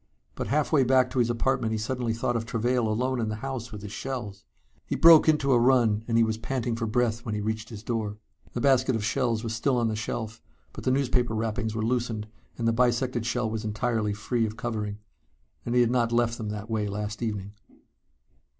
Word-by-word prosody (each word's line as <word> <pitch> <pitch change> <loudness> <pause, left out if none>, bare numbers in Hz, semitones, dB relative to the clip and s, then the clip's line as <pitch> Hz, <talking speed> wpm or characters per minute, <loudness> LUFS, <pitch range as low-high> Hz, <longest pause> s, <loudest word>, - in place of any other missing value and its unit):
But - - -4
halfway 150 -1 +2
back 130 0 +3
to 130 - -1
his 120 -1 +3
apartment 120 0 0
he - - 0
suddenly 120 0 -2
thought 120 +1 -1
of 115 - 0
Travail 120 0 0
alone 125 +4 0
in 110 - -1
the 110 - -2
house 120 0 -5
with 105 -2 -8
his 105 - -7
shells. 120 -5 -5 0.4
He - - -1
broke 165 -1 +8
into 145 -3 +2
a 120 - +5
run 120 -4 +3
and 115 -1 +1
he 115 - +5
was 110 0 -1
panting 120 -1 -2
for 115 0 -2
breath 115 0 0
when 110 -4 -3
he - - -2
reached 110 +1 -3
his 110 -3 -9
door. 110 -3 -2 0.4
The 120 - -3
basket 130 -1 +3
of 110 -2 -2
shells 115 -2 0
was 115 -1 -3
still 125 +3 +1
on 115 -2 +1
the 110 - -2
shelf, 110 0 -4 0.3
but - - -9
the - - +3
newspaper 125 -3 +1
wrappings 110 0 -2
were 110 -1 -1
loosened, 115 -3 -1 0.3
and 115 - -1
the 115 - +3
bisected 120 0 +1
shell 125 -2 0
was 110 0 -3
entirely 110 0 -1
free 115 +3 -1
of 110 +1 -7
covering. 105 -3 -3 0.7
And 120 - 0
he 125 - +6
had 120 -1 +3
not 120 -2 +1
left 120 0 +1
them 110 -2 -3
that 105 0 -5
way 110 -2 -1
last 105 +2 -4
evening. 105 -3 -3
115 Hz, 220 wpm, -27 LUFS, 110-125 Hz, 0.7 s, broke